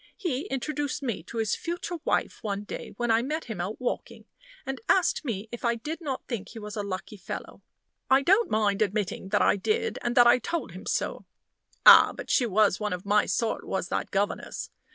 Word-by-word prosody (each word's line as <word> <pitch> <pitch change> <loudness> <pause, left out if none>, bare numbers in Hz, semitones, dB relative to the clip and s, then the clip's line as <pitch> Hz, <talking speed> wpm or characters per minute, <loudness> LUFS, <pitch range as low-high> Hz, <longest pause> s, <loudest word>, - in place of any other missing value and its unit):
He 310 -10 -2
introduced 285 +2 -3
me 235 -6 -2
to 230 - -8
his 220 -2 +1
future 345 +1 -4
wife - - 0
one 205 -2 -3
day - - -7
when 240 -1 +1
I 225 +1 +4
met 305 +6 -3
him 220 -7 -4
out 195 +5 -4
walking, 250 - -4 0.4
and 270 0 -4
asked 365 -4 +3
me 225 -6 -3
if 240 - -7
I 235 -1 +2
did 300 +9 -6
not 275 -5 -4
think 235 -6 -4
he 230 - -11
was 210 -1 -7
a 210 - -2
lucky 200 +1 -5
fellow. 185 - -7 0.5
I 265 +1 +5
don't 395 +9 +4
mind 210 -2 +1
admitting 200 -2 -1
that 205 - +3
I - - +4
did, 455 - -1
and 240 0 -1
that 245 - +8
I 240 - +6
told 310 - -3
him 185 +2 -10
so. - - -2 0.6
Ah! - - +10
but - - -5
she 245 - +3
was 210 -2 +3
one 210 -3 -1
of 180 +1 -6
my 205 +1 +3
sort, 230 -2 -1
was 190 -1 -3
that - - -2
governess. 200 +1 -2
230 Hz, 210 wpm, -27 LUFS, 205-275 Hz, 0.6 s, Ah